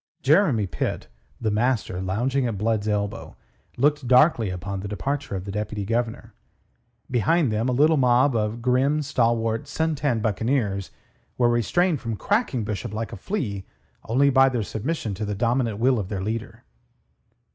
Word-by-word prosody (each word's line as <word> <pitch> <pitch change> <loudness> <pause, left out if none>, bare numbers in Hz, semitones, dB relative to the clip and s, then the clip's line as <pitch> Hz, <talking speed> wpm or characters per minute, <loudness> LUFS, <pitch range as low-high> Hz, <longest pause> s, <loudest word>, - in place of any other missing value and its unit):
Jeremy 140 - +3
Pitt, 90 - -4 0.3
the 110 - -1
master, 110 -4 0
lounging 125 +8 0
at 110 -4 -3
Blood's 110 0 0
elbow, 105 +1 -2 0.4
looked 145 0 +1
darkly 125 - +4
upon 95 +2 -4
the 100 - -5
departure 135 +3 -3
of 95 0 -5
the 100 - -5
Deputy 105 0 -3
Governor. 115 +1 -2 0.8
Behind 130 - +2
them 110 +4 0
a - - +1
little 150 +5 +4
mob 125 +1 +3
of 110 +1 -1
grim, 135 +4 +2
stalwart, 115 -4 0
sun 160 0 -1
tanned 135 -7 -1
buccaneers 110 -3 0 0.5
were 120 -1 +3
restrained 150 - +1
from 115 -1 -3
cracking 200 - 0
Bishop 105 +1 -4
like 110 -1 -4
a - - -4
flea 100 - -3 0.4
only 140 +5 +3
by 135 0 +5
their 120 -4 -1
submission 110 +1 -3
to 100 +3 -5
the 105 -1 -2
dominant 115 0 0
will 125 +2 +2
of 95 -2 -4
their 100 -3 -3
leader. 110 +2 -5
115 Hz, 160 wpm, -24 LUFS, 105-135 Hz, 0.8 s, by